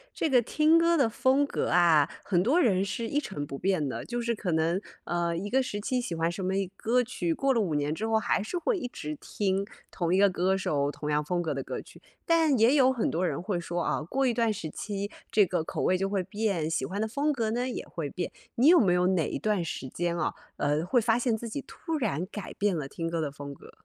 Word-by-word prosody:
这 320 Hz, -, 0 dB
个 250 Hz, -2 st, +5 dB
听 310 Hz, +7 st, +3 dB
歌 335 Hz, 0 st, +4 dB
的 270 Hz, -, +4 dB
风 265 Hz, +5 st, +2 dB
格 -, -, -2 dB
啊， 165 Hz, -5 st, +5 dB
很 175 Hz, -3 st, +2 dB
多 270 Hz, -, +3 dB
人 195 Hz, -, +3 dB
是 205 Hz, +4 st, -3 dB
一 285 Hz, -, +1 dB
成 190 Hz, -, -5 dB
不 140 Hz, -, -6 dB
变 180 Hz, -4 st, 0 dB
的。 -, -, -4 dB
就 240 Hz, 0 st, -3 dB
是 235 Hz, 0 st, 0 dB
可 195 Hz, -4 st, -3 dB
能， 165 Hz, +3 st, +1 dB, 0.2 s
呃， 170 Hz, -1 st, -1 dB
一 200 Hz, +4 st, -4 dB
个 265 Hz, +4 st, +3 dB
时 230 Hz, -5 st, -4 dB
期 250 Hz, +4 st, -1 dB
喜 175 Hz, -8 st, -4 dB
欢 165 Hz, +1 st, 0 dB
什 185 Hz, +2 st, -5 dB
么 190 Hz, +1 st, 0 dB
一 195 Hz, -1 st, 0 dB
歌 245 Hz, +5 st, +2 dB
曲， 185 Hz, -9 st, -2 dB
过 270 Hz, +8 st, +1 dB
了 230 Hz, -, +2 dB
5 170 Hz, -7 st, -1 dB
年 145 Hz, +1 st, 0 dB
之 215 Hz, +7 st, -3 dB
后 225 Hz, 0 st, +3 dB
还 220 Hz, -, +1 dB
是 220 Hz, -, -3 dB
会 390 Hz, +6 st, 0 dB
一 300 Hz, -, -3 dB
直 155 Hz, -10 st, -6 dB
听 195 Hz, -1 st, -1 dB, 0.3 s
同 175 Hz, -1 st, -1 dB
一 -, -, +4 dB
个 200 Hz, +1 st, +6 dB
歌 185 Hz, +1 st, +1 dB
手、 145 Hz, -6 st, 0 dB
同 150 Hz, 0 st, -5 dB
样 150 Hz, 0 st, +1 dB
风 175 Hz, +4 st, -1 dB
格 165 Hz, -, -2 dB
的 -, -, -3 dB
歌 -, -, -5 dB
曲， -, -, -16 dB, 0.2 s
但 325 Hz, -5 st, +3 dB
也 235 Hz, +5 st, +5 dB
有 265 Hz, -2 st, +5 dB
很 245 Hz, -4 st, 0 dB
多 175 Hz, +3 st, 0 dB
人 155 Hz, -4 st, -2 dB
会 185 Hz, -1 st, -2 dB
说 175 Hz, 0 st, -3 dB
啊， -, -, 0 dB
过 265 Hz, -, -1 dB
一 245 Hz, -, +2 dB
段 230 Hz, -1 st, +2 dB
时 175 Hz, -6 st, -5 dB
期 200 Hz, +4 st, -4 dB, 0.2 s
这 210 Hz, -2 st, +5 dB
个 175 Hz, -3 st, -1 dB
口 -, -, -4 dB
味 185 Hz, -, +3 dB
就 195 Hz, +1 st, -1 dB
会 195 Hz, -2 st, 0 dB
变， 195 Hz, -4 st, -1 dB
喜 160 Hz, -, -1 dB
欢 190 Hz, +8 st, -4 dB
的 220 Hz, -, 0 dB
风 285 Hz, +7 st, 0 dB
格 230 Hz, -6 st, -1 dB
呢 245 Hz, +3 st, -1 dB
也 245 Hz, -, -5 dB
会 155 Hz, -4 st, -4 dB
变， 175 Hz, -, -4 dB, 0.2 s
你 250 Hz, +5 st, +4 dB
有 350 Hz, +2 st, +8 dB
没 190 Hz, -7 st, +4 dB
有 180 Hz, 0 st, +3 dB
哪 180 Hz, -5 st, +1 dB
一 -, -, -3 dB
段 210 Hz, -4 st, 0 dB
时 145 Hz, -4 st, -5 dB
间 175 Hz, +4 st, -2 dB
啊， 170 Hz, -, -1 dB, 0.2 s
呃， 145 Hz, +2 st, +1 dB
会 245 Hz, +7 st, +3 dB
发 225 Hz, 0 st, +2 dB
现 240 Hz, -3 st, +1 dB
自 235 Hz, -, -6 dB
己 255 Hz, +6 st, -4 dB
突 325 Hz, -2 st, -4 dB
然 195 Hz, -, -1 dB
改 210 Hz, -, -6 dB
变 205 Hz, -2 st, 0 dB
了 145 Hz, -3 st, -4 dB
听 165 Hz, +4 st, -4 dB
歌 165 Hz, -1 st, -1 dB
的 150 Hz, -2 st, -2 dB
风 140 Hz, 0 st, -8 dB
格？ -, -, -15 dB
195 Hz, 280 characters per minute, -28 LUFS, 170-240 Hz, 0.3 s, 有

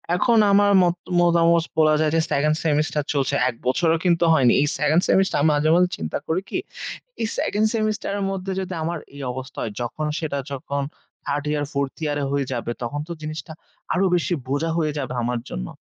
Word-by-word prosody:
এখন 230 Hz, +5 st, +3 dB
আমার 200 Hz, 0 st, +5 dB
মত 175 Hz, 0 st, +2 dB, 0.2 s
মতামত 170 Hz, -1 st, +4 dB
বলা 155 Hz, -1 st, +5 dB
যায় 155 Hz, -1 st, +2 dB
যে -, -, +4 dB
2nd 150 Hz, +2 st, +2 dB
semester 150 Hz, 0 st, +1 dB
চলছে। 140 Hz, -2 st, 0 dB
১ 120 Hz, -, -6 dB
বছরও 165 Hz, +5 st, +2 dB
কিন্তু 170 Hz, -1 st, +3 dB
হয়নি। 125 Hz, -6 st, +5 dB
এই 145 Hz, -, +2 dB
2nd 155 Hz, +3 st, +3 dB
semester 190 Hz, 0 st, +3 dB
আমি 155 Hz, -, +4 dB
মাঝে, 150 Hz, +2 st, +2 dB
মাঝে 180 Hz, 0 st, +4 dB
চিন্তা 80 Hz, -, -3 dB
করি 170 Hz, +4 st, 0 dB
কি, -, -, -2 dB, 0.6 s
এই 220 Hz, -, +1 dB
2nd 215 Hz, +1 st, +1 dB
semester 215 Hz, -2 st, -1 dB
এর 200 Hz, -, -2 dB
মধ্যে 190 Hz, 0 st, -4 dB
যদি 185 Hz, -1 st, -4 dB
আমার 170 Hz, 0 st, -2 dB, 0.2 s
এই 140 Hz, -, -8 dB
অবস্থা 130 Hz, +1 st, -8 dB
হয় 105 Hz, -, -4 dB
যখন 150 Hz, +6 st, -3 dB
সেটা 150 Hz, -3 st, -2 dB
যখন 140 Hz, +1 st, -3 dB, 0.4 s
3rd 145 Hz, 0 st, -1 dB
year, 150 Hz, -1 st, 0 dB
4th 140 Hz, -1 st, -2 dB
year 145 Hz, -1 st, -1 dB
হয়ে 140 Hz, -1 st, 0 dB
যাবে 120 Hz, -1 st, -3 dB
তখন 140 Hz, +5 st, -3 dB
তো -, -, -7 dB
জিনিসটা 155 Hz, +2 st, -6 dB, 0.4 s
আরো 190 Hz, +2 st, +2 dB
বেশি 175 Hz, +1 st, 0 dB
বোঝা 145 Hz, +5 st, -1 dB
হয়ে 155 Hz, -2 st, +1 dB
যাবে 130 Hz, -3 st, -3 dB
আমার 120 Hz, 0 st, -1 dB
জন্য। -, -, -4 dB
155 Hz, 195 wpm, -23 LUFS, 140-175 Hz, 0.6 s, আমার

